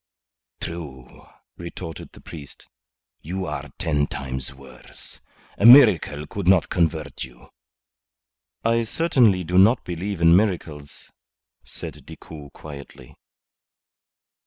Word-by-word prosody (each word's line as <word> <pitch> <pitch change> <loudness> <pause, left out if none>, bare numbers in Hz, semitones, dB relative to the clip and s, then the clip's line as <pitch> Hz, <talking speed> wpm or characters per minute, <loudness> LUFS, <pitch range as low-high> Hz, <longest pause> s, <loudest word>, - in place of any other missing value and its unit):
"True," 70 -7 -9 0.3
retorted 85 -1 -8
the - - -15
priest. 75 -4 -11 0.5
"You 95 +4 -4
are - - -5
ten 75 -2 0
times 65 -1 -5
worse. 65 -2 -15 0.4
A 100 - +2
miracle 105 - +7
could 95 +4 -6
not 95 -2 +4
convert 80 -5 -1
you." - - -14 1.2
"I 115 0 +2
certainly 115 - +2
do 90 +2 +2
not 110 +6 +5
believe 90 +2 -4
in 85 0 +6
miracles," 80 -8 -2 0.5
said - - -10
Decoud, 75 -3 -11
quietly. 70 -3 -12
85 Hz, 105 wpm, -23 LUFS, 70-95 Hz, 1.2 s, miracle